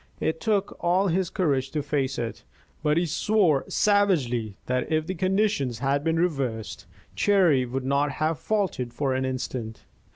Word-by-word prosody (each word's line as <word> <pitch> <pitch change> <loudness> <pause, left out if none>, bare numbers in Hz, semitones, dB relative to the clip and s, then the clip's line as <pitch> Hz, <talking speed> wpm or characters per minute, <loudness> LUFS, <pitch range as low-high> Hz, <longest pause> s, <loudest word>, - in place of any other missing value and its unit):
It 160 0 -1
took 205 -3 0
all 185 +3 +3
his 180 +1 0
courage 140 -9 0
to 150 -2 -1
face 135 -2 -1
it, 115 -1 -4 0.4
but 150 0 +2
he 175 - +2
swore 170 -2 +2
savagely 145 - +1
that 125 +2 -1
if 155 0 +1
the 185 - -3
conditions 185 - 0
had 140 +3 0
been 165 +1 +1
reversed, 130 - -2 0.3
Cherry 175 -11 +3
would 130 +1 -3
not 140 +1 +1
have 155 0 -1
faltered 180 - -1
for 135 -1 0
an 130 0 -1
instant. 125 -3 -4
150 Hz, 160 wpm, -26 LUFS, 130-185 Hz, 0.4 s, all